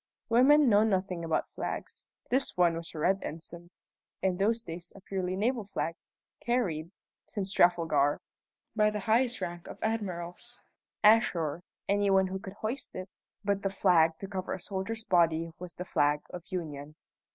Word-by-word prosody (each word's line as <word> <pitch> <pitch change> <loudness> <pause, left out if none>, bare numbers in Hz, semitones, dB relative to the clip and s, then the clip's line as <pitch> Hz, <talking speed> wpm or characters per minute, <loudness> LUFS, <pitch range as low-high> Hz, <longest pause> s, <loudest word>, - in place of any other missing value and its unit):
Women 270 +5 +6
know 210 -2 +6
nothing 185 -4 0
about 165 -1 0
flags. - - -5 0.2
This 265 -4 +1
one 175 -2 +4
was 165 0 -6
a - - -5
red 190 +5 +2
ensign, 170 +2 -6 0.5
in 185 -2 +2
those 225 +4 +2
days 170 -1 -6
a - - -11
purely 185 -1 -2
naval 230 +4 0
flag, 165 -5 -2 0.5
carried 185 -10 0 0.4
(since 195 -1 -2
Trafalgar) 165 -5 +3 0.6
by 210 -1 +4
the 210 -1 -3
highest 235 +3 +2
rank 175 -1 -5
of - - -8
admirals. 185 -6 -4 0.4
Ashore, 180 -8 +4 0.3
any 200 0 +2
one 190 0 +2
could 190 0 -8
hoist 230 +6 -4
it, 185 +1 -6 0.4
but 200 -1 +1
the 195 - 0
flag 170 -4 +4
to 195 - -6
cover 190 -2 -3
a - - -4
soldier's 200 +4 -4
body 165 -3 +2
was 180 -1 -8
the 180 - -5
flag 145 -3 +2
of 175 -1 -8
Union. 150 -4 -5
190 Hz, 160 wpm, -30 LUFS, 170-210 Hz, 0.6 s, Women